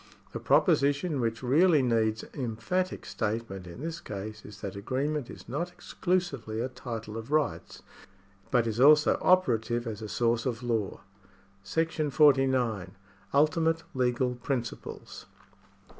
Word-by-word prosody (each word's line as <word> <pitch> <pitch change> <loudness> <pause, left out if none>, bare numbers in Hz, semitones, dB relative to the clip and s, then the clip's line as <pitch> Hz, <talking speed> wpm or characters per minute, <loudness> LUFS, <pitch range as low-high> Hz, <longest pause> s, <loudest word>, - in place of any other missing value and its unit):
The - - -5
proposition 145 +1 +2
which 115 +1 -2
really 150 +3 +4
needs 110 -3 +1
emphatic 145 +9 -2
state 115 +1 -2
ment 95 -2 -7
in 85 +8 -9
this 165 +1 -5
case 105 +1 -7
is 105 0 -12
that 100 - -5
agreement 130 +6 -2
is - - -11
not 165 +8 -3
exclusively 175 -11 -2
a 125 - -1
title 115 -4 -6
of 115 +2 -7
rights, 155 -1 -1 0.7
but 120 -3 +3
is 115 0 -2
also 150 +3 +6
operative 120 -10 +2
as 110 -2 -5
a 110 - -6
source 120 +2 +1
of 120 -1 -3
law. 115 -5 -2 0.6
§ 155 +4 -1
40. 130 -8 +3 0.4
Ultimate 160 +3 +2
Legfal 125 -1 0
Principles. 120 -4 -5
125 Hz, 130 wpm, -29 LUFS, 110-150 Hz, 0.7 s, also